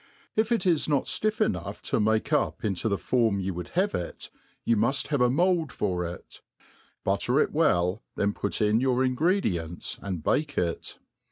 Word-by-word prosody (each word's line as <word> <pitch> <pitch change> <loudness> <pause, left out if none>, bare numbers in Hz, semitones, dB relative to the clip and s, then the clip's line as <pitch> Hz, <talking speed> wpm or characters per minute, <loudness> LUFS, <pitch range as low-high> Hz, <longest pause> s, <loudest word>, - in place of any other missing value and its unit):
If 220 +1 +1
it 230 -3 +1
is 165 -4 +2
not 140 -3 +2
fljff 215 0 -1
enough 90 +3 -1
to - - 0
make 110 +1 +1
up - - 0
into 100 +1 -1
the 100 - +1
form 115 -5 +1
you 95 0 -2
would 85 -1 -6
have 200 +2 +2
it, 85 - -5 0.3
you 115 - +2
muft 130 +6 +1
have 145 -4 +1
a 125 - +5
mould 170 +1 +2
for 90 -4 -1
it; 85 +1 -9 0.6
butter 110 +8 +1
it - - +2
well, 95 - +2
then 100 0 0
put 100 - -2
in 105 +1 +3
your 130 0 +2
ingredients, 130 - -1
and 90 -6 -4
bake 145 -1 0
it. 85 -1 -2
115 Hz, 180 wpm, -27 LUFS, 95-150 Hz, 0.6 s, a